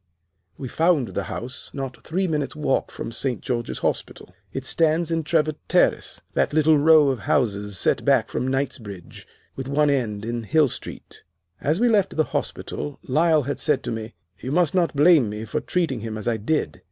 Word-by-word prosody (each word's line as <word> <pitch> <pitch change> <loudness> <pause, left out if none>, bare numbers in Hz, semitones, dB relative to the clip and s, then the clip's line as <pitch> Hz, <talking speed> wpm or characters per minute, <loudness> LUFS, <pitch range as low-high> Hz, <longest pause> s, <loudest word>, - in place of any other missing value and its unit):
We 130 - -5
found 160 -2 +2
the - - -3
house 125 +2 -6
not 135 -3 -5
three 185 +4 -1
minutes' 150 -5 -2
walk 150 -3 0
from - - -6
St. 125 +1 -2
George's 120 -3 -3
Hospital. 90 - -3 0.2
It 135 +3 -5
stands 165 +3 +2
in 165 0 +1
Trevor 155 0 +1
Terrace, - - +1
that - - +1
little 155 -1 +4
row 155 -1 +6
of 130 -3 -1
houses 105 -2 0
set - - +1
back - - +3
from 130 - -2
Knightsbridge, 115 -9 -4 0.3
with 135 -1 -5
one 145 +1 +2
end 110 -6 -1
in 120 +1 -3
Hill 150 +5 +3
Street. - - -7 0.4
"As 155 +5 0
we 245 - +4
left 205 -7 +2
the 155 - +4
hospital 145 -1 -4
Lyle 155 +2 +3
had 140 +2 -3
said 145 -3 +1
to - - -3
me, 110 0 -6 0.2
'You 130 - -5
must 170 -1 +2
not 175 -4 +1
blame 150 -5 +5
me 105 +1 -5
for 155 - -2
treating 165 -9 -1
him 110 0 -5
as 110 - -6
I 115 -1 +1
did. 110 - -1
140 Hz, 190 wpm, -23 LUFS, 120-160 Hz, 0.4 s, row